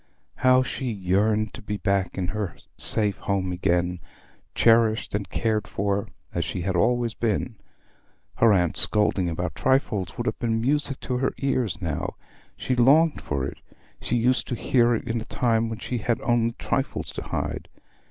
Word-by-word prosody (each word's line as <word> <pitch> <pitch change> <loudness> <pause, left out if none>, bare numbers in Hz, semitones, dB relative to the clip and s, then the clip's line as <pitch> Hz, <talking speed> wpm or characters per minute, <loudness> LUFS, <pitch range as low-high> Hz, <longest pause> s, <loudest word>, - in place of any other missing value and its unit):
How 130 0 +5
she 130 0 -4
yearned 105 +2 +1
to - - -9
be 105 0 -4
back 100 -2 0
in 90 -2 -1
her 105 -5 -3 0.2
safe 105 -3 0
home 95 -2 -1
again, 90 0 0 0.6
cherished 115 -1 +3
and 100 -1 -2
cared 110 -3 -1
for 100 0 -1 0.3
as - - 0
she 90 - -4
had 95 0 -1
always 120 +4 +2
been! 115 +1 -1 0.8
Her 115 -1 +5
aunt's 90 -4 +3
scolding 105 -4 +3
about 90 +2 -3
trifles 110 - 0
would 120 - -3
have - - -2
been 115 -2 0
music 140 +2 0
to 125 - -2
her 135 - 0
ears 125 -6 -1
now; 80 -3 -3 0.4
she 130 - -1
longed 145 +6 +4
for 70 -2 -2
it; - - -7 0.4
she 120 - -1
used 125 +2 +2
to 125 - -2
hear 120 -1 +3
it - - -5
in 115 0 -1
a - - -7
time 115 -2 +1
when 115 - -4
she 120 +2 -4
had 115 +2 0
only 120 -2 +1
trifles - - -2
to - - -6
hide. - - -4
110 Hz, 170 wpm, -25 LUFS, 95-120 Hz, 0.8 s, How